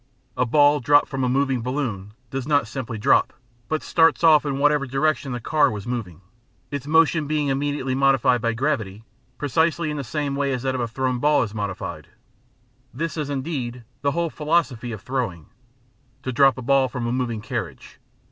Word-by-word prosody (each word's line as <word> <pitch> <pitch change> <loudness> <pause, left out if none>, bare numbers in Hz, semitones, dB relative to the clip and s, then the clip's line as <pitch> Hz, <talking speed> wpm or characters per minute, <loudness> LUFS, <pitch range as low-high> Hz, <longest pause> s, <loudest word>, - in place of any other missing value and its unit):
A 125 0 0
ball 145 +3 +4
dropped 145 +3 +4
from 135 -2 -2
a 125 - +1
moving 135 -1 +1
balloon 115 -6 -3 0.2
does 135 0 -4
not 145 -5 +2
simply 120 -1 -5
drop, 105 - +3 0.4
but 155 0 -1
starts 165 0 +3
off 155 -2 +6
in 135 -1 -1
whatever 145 -1 +2
direction 135 +1 0
the 125 - -3
car 150 +5 +2
was 105 -2 -6
moving, 110 -9 -5 0.5
its 140 -1 -5
motion 160 -1 +3
being 150 -1 0
immediately 135 -1 -1
modified 135 -2 +3
by 115 0 0
gravity, 115 -6 -2 0.3
precisely 160 +3 0
in 150 - -4
the 140 - -3
same 140 +2 -3
way 140 -1 0
as 125 -1 -3
that 130 -1 0
of 130 - -2
a 120 - -1
thrown 130 +2 -2
ball 150 +1 +3
is 105 -2 -6
modified. 100 -4 -5 0.8
This 165 -1 -4
is, 150 -3 -3
indeed, 130 -4 -4 0.2
the 140 0 +1
whole 170 -1 -1
philosophy 150 -7 0
of 105 -4 -7
throwing 115 - -3 0.7
to 130 - -3
drop 135 +1 +4
a 130 - -6
ball 135 +1 +3
from 125 -2 -4
a 120 - -1
moving 120 -3 -2
carriage. - - -6
135 Hz, 185 wpm, -23 LUFS, 120-145 Hz, 0.8 s, off